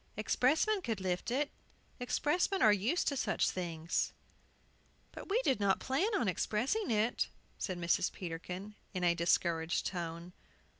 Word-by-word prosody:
"Expressmen 305 Hz, -, +2 dB
could 225 Hz, -, -2 dB
lift 185 Hz, +1 st, -2 dB
it. 280 Hz, +4 st, 0 dB, 0.5 s
Expressmen 300 Hz, +9 st, +1 dB
were 215 Hz, -, +8 dB
used 215 Hz, -, +1 dB
to 280 Hz, -, +1 dB
such 260 Hz, -, +1 dB
things." 170 Hz, -2 st, -2 dB, 1.0 s
"But -, -, -9 dB
we 425 Hz, +5 st, +3 dB
did 265 Hz, -, +2 dB
not 200 Hz, -2 st, +2 dB
plan 275 Hz, -, +1 dB
expressing 240 Hz, -, 0 dB
it," 225 Hz, +1 st, +1 dB, 0.3 s
said 185 Hz, -3 st, -2 dB
Mrs. 175 Hz, +1 st, +1 dB
Peterkin, 180 Hz, +3 st, -6 dB, 0.2 s
in 180 Hz, -, -1 dB
a 175 Hz, -1 st, +5 dB
discouraged 170 Hz, -1 st, +1 dB
tone. 170 Hz, -1 st, -4 dB
205 Hz, 135 wpm, -34 LUFS, 175-270 Hz, 1.0 s, were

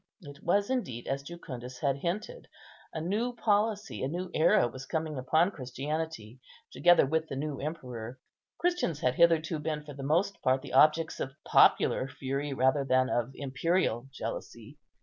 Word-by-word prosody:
It 145 Hz, -1 st, -11 dB
was 200 Hz, +6 st, +1 dB
indeed 130 Hz, -, -2 dB
as 135 Hz, 0 st, -2 dB
Jucundus 130 Hz, -6 st, -8 dB
had 140 Hz, -3 st, 0 dB
hinted; 205 Hz, -, -4 dB, 0.4 s
a 160 Hz, -, -4 dB
new 215 Hz, +9 st, -1 dB
policy, 210 Hz, -1 st, 0 dB
a 130 Hz, -, 0 dB
new 175 Hz, +5 st, -4 dB
era 155 Hz, -5 st, +4 dB
was 130 Hz, +3 st, -9 dB
coming 160 Hz, -1 st, -2 dB
upon 155 Hz, +8 st, +2 dB
Christianity, 135 Hz, -, -5 dB, 0.3 s
together 175 Hz, -3 st, +5 dB
with 160 Hz, +3 st, 0 dB
the 135 Hz, -, -5 dB
new 145 Hz, 0 st, -3 dB
emperor. 125 Hz, -6 st, -6 dB, 0.4 s
Christians 345 Hz, -, 0 dB
had 125 Hz, -, +2 dB
hitherto 165 Hz, 0 st, +3 dB
been 150 Hz, 0 st, -3 dB
for 150 Hz, -1 st, -9 dB
the 140 Hz, -, -9 dB
most 170 Hz, +8 st, 0 dB
part 130 Hz, +1 st, +2 dB
the 140 Hz, -, -9 dB
objects 155 Hz, +4 st, +4 dB
of 135 Hz, +1 st, -4 dB
popular 130 Hz, -, +4 dB
fury 135 Hz, +2 st, -4 dB
rather 130 Hz, +1 st, +2 dB
than 130 Hz, -1 st, +2 dB
of 120 Hz, 0 st, 0 dB
imperial 135 Hz, -2 st, 0 dB
jealousy. -, -, -7 dB
150 Hz, 160 wpm, -30 LUFS, 130-170 Hz, 0.4 s, together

